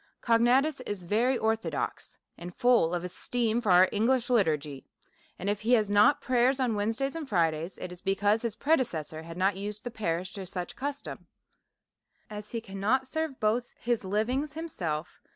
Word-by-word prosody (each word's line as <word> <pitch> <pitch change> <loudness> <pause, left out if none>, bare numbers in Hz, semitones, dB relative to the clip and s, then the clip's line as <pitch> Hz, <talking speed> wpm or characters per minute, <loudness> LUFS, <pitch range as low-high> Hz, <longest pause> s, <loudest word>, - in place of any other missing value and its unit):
Cognatus 250 +5 +3
is 200 -3 -4
very 235 +8 +2
orthodox, 225 0 -2 0.2
and 175 +1 -9
full 235 -9 +3
of 175 - -3
esteem 230 +5 -1
for 210 - +1
our 180 +1 +7
English 240 +4 +1
liturgy; 150 - +1 0.5
and 190 - -5
if 205 0 0
he 230 +3 +2
has 215 -4 +3
not 260 +8 +5
prayers 255 +1 +2
on 250 -3 +1
Wednesdays 225 +8 -1
and 310 -4 -5
Fridays, 165 -2 0
it 180 - -6
is 180 0 -10
because 205 +3 +1
his 230 -3 -2
predeces 260 - 0
sors 160 +1 -9
had 165 +1 -8
not 190 +1 +1
used 210 +2 -5
the 245 - -5
parish 185 -4 -2
to 200 - -6
any 190 - -7
such 180 -1 -5
custom. 285 +1 -6 1.0
As 210 0 -7
he 230 - -4
cannot 215 +6 0
serve 315 0 -3
both 225 +3 0
his 240 -2 -1
livings 235 +9 -1
himself 175 - -4
215 Hz, 175 wpm, -29 LUFS, 185-250 Hz, 1.0 s, our